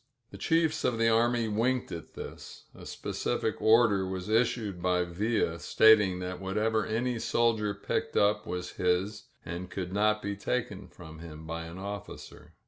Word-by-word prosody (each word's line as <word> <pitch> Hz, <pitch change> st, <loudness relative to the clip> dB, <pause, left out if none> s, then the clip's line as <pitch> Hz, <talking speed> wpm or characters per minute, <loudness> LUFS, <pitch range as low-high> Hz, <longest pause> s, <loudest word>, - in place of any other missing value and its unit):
The -, -, -9 dB
chiefs 165 Hz, -1 st, +1 dB
of 120 Hz, -, +1 dB
the 115 Hz, 0 st, +3 dB
army 115 Hz, +1 st, +2 dB
winked 120 Hz, +4 st, 0 dB
at 85 Hz, -, -8 dB
this. -, -, -9 dB
A -, -, -11 dB
specific -, -, -2 dB
order 110 Hz, -3 st, +5 dB
was 95 Hz, +1 st, -4 dB
issued 110 Hz, -5 st, +1 dB
by 90 Hz, 0 st, +2 dB
Villa 90 Hz, -1 st, -1 dB
stating 105 Hz, -1 st, +5 dB
that 90 Hz, 0 st, -5 dB
whatever 105 Hz, +3 st, 0 dB
any 120 Hz, +2 st, -1 dB
soldier 110 Hz, -3 st, +1 dB
picked 100 Hz, -, -2 dB
up 105 Hz, +1 st, +2 dB
was 90 Hz, 0 st, -4 dB
his 90 Hz, +4 st, 0 dB, 0.2 s
and 90 Hz, +2 st, -6 dB
could 90 Hz, 0 st, -5 dB
not 105 Hz, +1 st, +2 dB
be 100 Hz, 0 st, -2 dB
taken 100 Hz, -1 st, -3 dB
from 80 Hz, -3 st, -12 dB
him 80 Hz, -1 st, -10 dB
by 80 Hz, +1 st, -5 dB
an 85 Hz, +2 st, -9 dB
officer. 100 Hz, 0 st, -8 dB
100 Hz, 160 wpm, -29 LUFS, 90-115 Hz, 0.2 s, order